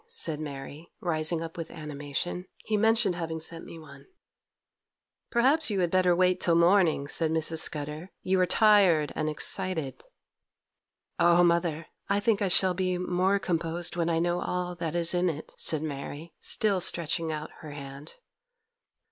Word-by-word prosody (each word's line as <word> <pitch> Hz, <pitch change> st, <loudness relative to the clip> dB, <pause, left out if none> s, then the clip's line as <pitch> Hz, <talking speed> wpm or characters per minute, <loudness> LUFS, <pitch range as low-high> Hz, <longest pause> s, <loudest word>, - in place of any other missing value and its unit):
said 165 Hz, -, -2 dB
Mary, 145 Hz, +2 st, -8 dB
rising 165 Hz, -1 st, 0 dB
up 165 Hz, 0 st, -8 dB
with 165 Hz, -1 st, -6 dB
animation; 150 Hz, +4 st, -5 dB, 0.2 s
'he 215 Hz, -, 0 dB
mentioned 220 Hz, -2 st, +3 dB
having 165 Hz, -2 st, -4 dB
sent 165 Hz, +1 st, -7 dB
me -, -, -10 dB
one.' 160 Hz, -, -14 dB, 1.2 s
'Perhaps 275 Hz, +6 st, +3 dB
you 200 Hz, -2 st, -1 dB
had 175 Hz, -2 st, +1 dB
better 185 Hz, -1 st, +3 dB
wait 185 Hz, 0 st, +2 dB
till 170 Hz, -, +3 dB
morning,' 170 Hz, -4 st, +3 dB
said 160 Hz, +2 st, -1 dB
Mrs. 160 Hz, 0 st, +1 dB
Scudder; 150 Hz, +3 st, -3 dB
'you 190 Hz, 0 st, +1 dB
are 180 Hz, -, +3 dB
tired 195 Hz, -9 st, +4 dB
and 155 Hz, 0 st, -1 dB
excited.' 160 Hz, -2 st, -1 dB, 1.2 s
'Oh, 175 Hz, +1 st, +5 dB
mother, 170 Hz, -2 st, +1 dB, 0.2 s
I 200 Hz, +1 st, +2 dB
think 210 Hz, 0 st, +1 dB
I 200 Hz, -, +2 dB
shall 185 Hz, 0 st, +3 dB
be 185 Hz, 0 st, -1 dB
more 180 Hz, +2 st, +1 dB
composed 170 Hz, -2 st, -2 dB
when 170 Hz, -1 st, 0 dB
I 165 Hz, -, +1 dB
know 175 Hz, +1 st, 0 dB
all 180 Hz, 0 st, -2 dB
that 170 Hz, -2 st, -4 dB
is 170 Hz, 0 st, +2 dB
in 180 Hz, 0 st, +2 dB
it,' 155 Hz, -1 st, -7 dB
said 155 Hz, -1 st, 0 dB
Mary, 145 Hz, +2 st, -6 dB
still 200 Hz, -4 st, 0 dB
stretching 165 Hz, -1 st, 0 dB
out 155 Hz, 0 st, -5 dB
her 155 Hz, -, -9 dB
hand. 140 Hz, 0 st, -9 dB
170 Hz, 160 wpm, -28 LUFS, 155-185 Hz, 1.2 s, Oh